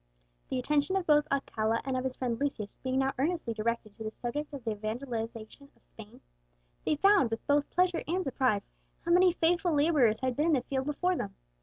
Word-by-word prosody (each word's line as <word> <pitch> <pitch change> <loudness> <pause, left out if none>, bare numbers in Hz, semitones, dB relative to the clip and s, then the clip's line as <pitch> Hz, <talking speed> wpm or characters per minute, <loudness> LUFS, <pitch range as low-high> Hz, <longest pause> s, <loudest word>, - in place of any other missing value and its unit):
The 260 - -1
attention 290 +7 +1
of 380 -2 0
both 295 -1 +4
Alcala 230 -5 0
and 265 -1 -1
of 255 - -1
his 260 -1 -3
friend 240 -3 -2
Lucius 260 -8 -3
being 260 0 -1
now 270 0 +1
earnestly 310 -5 0
directed 220 -1 -2
to 220 - -9
the 215 - -3
subject 290 +7 -4
of 280 -4 -8
the 225 - -1
evangelization 225 +3 -5
of - - -31
Spain, - - -13 0.6
they - - +1
found, 390 - +4
with 225 0 -4
both 285 0 +2
pleasure 360 -1 +1
and 365 +4 0
surprise, 255 - 0 0.3
how 340 - 0
many 360 +1 +6
faithful 345 0 +1
labourers 285 -8 +3
had 255 -1 0
been 300 +5 +1
in 330 - +3
the 265 - +3
field 265 +1 -2
before 360 +5 0
them. 200 - -4
270 Hz, 205 wpm, -30 LUFS, 230-310 Hz, 0.6 s, many